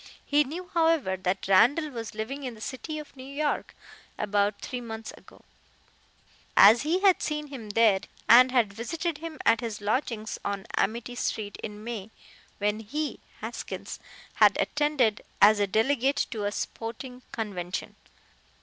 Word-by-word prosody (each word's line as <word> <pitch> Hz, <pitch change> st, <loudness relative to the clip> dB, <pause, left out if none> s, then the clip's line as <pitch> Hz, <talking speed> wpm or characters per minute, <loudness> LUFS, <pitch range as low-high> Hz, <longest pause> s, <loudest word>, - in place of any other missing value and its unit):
He 290 Hz, +1 st, +4 dB
knew, 335 Hz, +6 st, -7 dB
however, 325 Hz, -, +2 dB
that 185 Hz, +1 st, -2 dB
Randall 280 Hz, -, +4 dB
was 230 Hz, -4 st, -6 dB
living 240 Hz, +7 st, -4 dB
in 250 Hz, -4 st, -5 dB
the -, -, -14 dB
city 270 Hz, +7 st, -5 dB
of 300 Hz, -2 st, -9 dB
New 260 Hz, -, -10 dB
York 285 Hz, +2 st, -2 dB, 0.4 s
about 205 Hz, 0 st, 0 dB
three 250 Hz, -1 st, -5 dB
months 225 Hz, -1 st, -7 dB
ago, -, -, -19 dB, 1.1 s
as 220 Hz, +4 st, +8 dB
he 335 Hz, +6 st, 0 dB
had 390 Hz, -3 st, +5 dB
seen 300 Hz, -1 st, -3 dB
him 240 Hz, -7 st, -8 dB
there, 210 Hz, -2 st, +4 dB, 0.3 s
and 250 Hz, +2 st, +8 dB
had 235 Hz, -6 st, +2 dB
visited 315 Hz, -, -3 dB
him 325 Hz, -1 st, -7 dB
at 230 Hz, -1 st, +4 dB
his 225 Hz, -3 st, -4 dB
lodgings 220 Hz, +1 st, -2 dB
on 200 Hz, -1 st, -3 dB
Amity 230 Hz, +3 st, -1 dB
street 215 Hz, -4 st, -3 dB
in 210 Hz, 0 st, -7 dB
May, 220 Hz, -3 st, -5 dB, 0.5 s
when 210 Hz, +1 st, 0 dB
he 290 Hz, +8 st, -4 dB, 0.2 s
(Haskins) -, -, -6 dB, 0.3 s
had -, -, +5 dB
attended 295 Hz, -8 st, +1 dB, 0.2 s
as 210 Hz, +1 st, +7 dB
a 205 Hz, -, +2 dB
delegate 265 Hz, +7 st, +2 dB
to 215 Hz, -3 st, -3 dB
a 205 Hz, -, 0 dB
sporting 235 Hz, +4 st, -6 dB
convention. 190 Hz, -5 st, -4 dB
230 Hz, 150 wpm, -27 LUFS, 210-285 Hz, 1.1 s, as